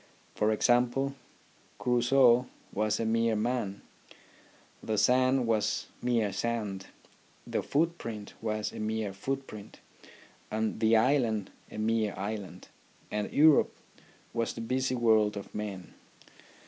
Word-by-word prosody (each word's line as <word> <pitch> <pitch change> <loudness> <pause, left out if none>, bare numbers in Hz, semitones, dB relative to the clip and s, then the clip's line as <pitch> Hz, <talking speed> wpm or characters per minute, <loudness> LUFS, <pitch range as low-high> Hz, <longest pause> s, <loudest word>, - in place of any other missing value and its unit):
For 105 +1 +1
example, 125 +4 +2 0.6
Crusoe 125 0 +4 0.3
was 105 +1 0
a 115 - 0
mere 115 0 +2
man, 110 -2 -2 1.0
the 110 -1 -2
sand 130 +3 +3
was 110 -2 0 0.2
mere 115 -5 +1
sand, 105 -5 -3 0.6
the - - -1
footprint 140 -10 -2
was 110 -1 -2
a - - -7
mere 110 -2 -2
footprint, 110 -1 -6 0.7
and 110 0 -2
the 110 0 +4
island 115 -4 +1 0.2
a - - -9
mere 110 -1 0
island, 100 -2 -6 0.4
and 105 0 -2
Europe 155 0 +5 0.6
was 115 -1 -1
the 115 - -7
busy 130 +2 0
world 110 -3 +3
of 100 - -8
men. 100 -4 -6
110 Hz, 115 wpm, -30 LUFS, 105-125 Hz, 1.0 s, Europe